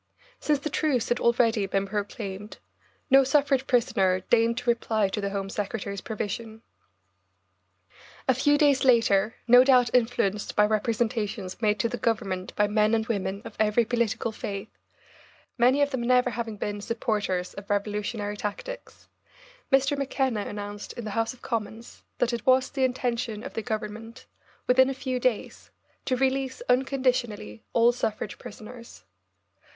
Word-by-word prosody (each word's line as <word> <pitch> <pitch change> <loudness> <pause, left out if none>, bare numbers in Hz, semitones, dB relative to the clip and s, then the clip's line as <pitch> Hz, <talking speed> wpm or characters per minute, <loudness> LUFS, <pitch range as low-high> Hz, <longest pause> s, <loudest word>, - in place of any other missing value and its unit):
Since 300 -1 +1
the 285 +2 -5
truce 280 -6 0
had 240 - +1
already 230 -3 +2
been 195 +1 0
proclaimed, 205 0 -5 0.5
no 270 0 +8
suffrage 270 -1 +2
prisoner 190 -6 +2
deigned 230 0 +3
to 250 -1 -2
reply 220 -3 0
to 210 +2 -3
the 200 - -1
Home 195 -1 -3
Secretary's 200 -1 -4
provision. 220 +1 -5 1.6
A 260 - +5
few 290 +4 +3
days 285 -2 +3
later, 230 -4 +3
no 245 +1 +8
doubt 250 -3 +4
influenced 225 -4 +1
by 210 - +5
representations 215 -2 -1
made 210 -2 +2
to 230 - +1
the 240 +1 -5
Government 195 -5 -1
by 210 - +3
men 215 +1 +2
and 220 -1 0
women 200 -3 -3
of - - -9
every 215 +2 +3
political 230 -1 -1
faith 200 -1 -6 0.9
many 260 +4 +4
of 285 - -1
them 260 - -2
never 250 +1 +3
having 225 -1 -4
been 205 0 -4
supporters 205 -5 -2
of 200 0 -10
revolutionary 205 +1 -2
tactics 210 - -7 0.6
Mr. 275 +2 +3
McKenna 265 -5 -1
announced 205 0 -6
in 240 - -7
the 210 - -4
House 225 +2 0
of 255 - -16
Commons 225 0 -5 0.2
that 245 0 +1
it 235 - -3
was 260 0 +4
the 270 -2 -1
intention 240 -3 -1
of 275 - -7
the 225 - -3
Government, 220 +1 -6 0.4
within 260 +1 +5
a 270 - -3
few 260 -1 -3
days, 245 -4 -2 0.4
to 255 - 0
release 265 - -1
unconditionally, 250 - 0
all 235 0 +4
suffrage 215 -4 -3
prisoners. 225 - -11
230 Hz, 150 wpm, -26 LUFS, 210-250 Hz, 1.6 s, no